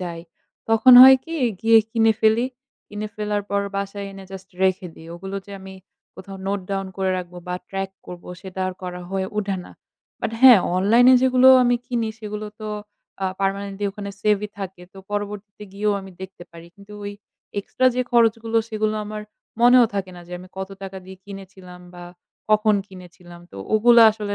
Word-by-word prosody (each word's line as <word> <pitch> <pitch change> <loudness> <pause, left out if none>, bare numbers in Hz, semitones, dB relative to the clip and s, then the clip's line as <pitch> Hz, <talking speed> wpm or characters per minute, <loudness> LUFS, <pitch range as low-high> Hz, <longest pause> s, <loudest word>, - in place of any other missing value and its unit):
যাই। 170 -2 -6 0.5
তখন 225 +3 +6
হয় 265 0 +10
কি? 330 - -7 0.3
গিয়ে 225 0 +6
কিনে 225 -1 +3
ফেলি। 225 +3 +3 0.4
কিনে 210 +1 -5
ফেলার 210 -1 -2
পর 200 0 +1 0.2
বাসায় 200 0 -4
এনে 195 0 -11
জাস্ট 190 0 -10
রেখে 185 -1 +1
দিই। 160 - -14
ওগুলো 195 +3 -7
যে - - -13
আমি 190 0 -11 0.4
কোথাও 195 +1 -10
নোট 200 +1 -1
ডাউন 195 -1 -2
করে 190 -1 -1
রাখবো 180 0 -8
বা 180 - -2
ট্র্যাক 195 0 -4 0.2
করবো 175 -1 -10
সেটা 190 0 -8
আর - - -4
করা 180 -1 -6
হয়ে 190 -1 -2
ওঠে 200 -2 -1
না। - - -14 0.5
বাট - - -2
হ্যাঁ, 255 -4 +9 0.2
অনলাইনে 235 +7 +5
যেগুলো 255 0 +5
আমি 245 0 +2
কিনি 235 -3 -2
সেগুলো 210 -1 -6
তো 215 - -6 0.5
আ - - +1
permanently 195 +1 -2
ওখানে 200 0 -7
save-ই 210 0 +1
থাকে। 190 -2 -7
তো 195 - -14
পরবর্তীতে 205 0 -6
গিয়েও 210 +1 0
আমি 195 0 -11
দেখতে 190 -1 -10
পারি। 170 0 -13
কিন্তু 200 +1 -15
ওই 205 - -5 0.5
extra 255 +5 -1
যে 250 - 0
খরচগুলো 230 -1 +2
সেগুলো 215 -1 -1
আমার 210 0 -6 0.4
মনেও 245 +1 +7
থাকে 190 -2 -3
না - - -10
যে, 175 - -12
আমি 185 +1 -13
কত 190 0 -4
টাকা 195 0 -7
দিয়ে 190 0 -11
কিনেছিলাম? 190 -2 -12
বা 175 0 -10 0.5
কখন 215 0 +4
কিনেছিলাম? 180 -2 -14
তো - - -13 0.2
ওগুলো 235 +2 +6
আসলে 210 -1 -5
200 Hz, 180 wpm, -22 LUFS, 190-215 Hz, 0.5 s, হয়